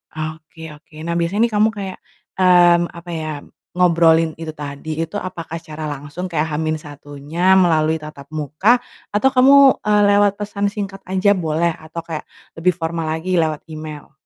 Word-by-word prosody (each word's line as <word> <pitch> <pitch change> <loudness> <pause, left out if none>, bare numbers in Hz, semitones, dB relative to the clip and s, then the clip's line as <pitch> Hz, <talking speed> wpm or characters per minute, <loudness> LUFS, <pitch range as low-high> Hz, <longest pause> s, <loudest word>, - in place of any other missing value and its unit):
Oke 155 +1 -7
oke, 150 +2 -23
nah 170 - -1
biasanya 185 +7 +1
nih 230 - -12
kamu 215 +1 +4
kayak, 195 -3 -6 0.4
mmm, 175 -2 +5
apa 170 0 -10
ya, 155 -1 -4 0.4
ngobrolin 165 -2 +3
itu 160 -1 -6
tadi, 150 +1 -6
itu 185 - -12
apakah 170 -4 -5
secara 155 -2 -7
langsung 145 +5 -6
kayak 160 -2 -2
H-1-nya 150 +2 -1
melalui 160 -4 +3
tatap 150 -3 -9
muka 155 - +2 0.3
atau 210 +6 +2
kamu, 270 +1 +6
eee, 210 0 +2
lewat 205 0 +4
pesan 205 0 -2
singkat 200 -2 -5
aja 190 +2 +2
boleh, 170 -3 +1
atau 160 +1 -8
kayak 160 -2 -6 0.3
lebih 180 +1 +2
formal 165 -1 -3
lagi 165 +3 -1
lewat 155 -2 -1
email? 155 -1 -8
165 Hz, 155 wpm, -19 LUFS, 155-190 Hz, 0.4 s, kamu